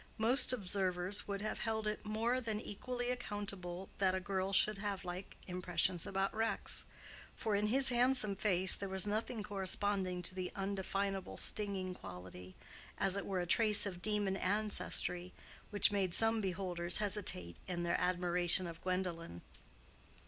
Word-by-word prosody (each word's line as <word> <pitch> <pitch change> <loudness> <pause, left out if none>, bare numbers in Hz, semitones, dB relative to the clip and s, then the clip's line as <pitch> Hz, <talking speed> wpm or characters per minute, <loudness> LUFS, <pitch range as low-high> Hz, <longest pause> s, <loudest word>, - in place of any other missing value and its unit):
Most 235 +5 +4
observers 190 -3 -1
would 200 0 -4
have 215 - -4
held 220 -1 -3
it 210 0 -3
more 225 +4 -1
than 220 -3 -4
equally 245 +3 -5
accountable 200 -6 -5
that 190 -1 +1
a - - -1
girl 190 0 -3
should 195 +1 +2
have 200 -2 -4
like 180 +2 -8
impressions 180 -1 0
about 195 0 -2
Rex, 225 +1 +1 0.5
for 220 - -3
in 205 +1 +1
his 265 +4 +5
handsome 245 -4 +3
face 190 -2 +4
there 200 - -5
was 190 +1 +4
nothing 215 +1 -3
corresponding 195 -2 -1
to 185 - -5
the 185 -1 -5
undefinable 195 -1 -3
stinging 195 -3 0
quality—as 95 - -3
it 200 - -4
were 190 -2 -2
a - - -3
trace 210 +2 +5
of 180 -3 -6
demon 205 -2 -1
ancestry—which 200 -1 0
made 190 -4 0
some 225 0 +2
beholders 180 -2 0
hesitate 195 - +1
in 175 -2 -4
their 170 0 -1
admiration 180 0 +4
of 165 -1 -9
Gwendolen. 180 - -4
195 Hz, 145 wpm, -35 LUFS, 180-210 Hz, 0.5 s, his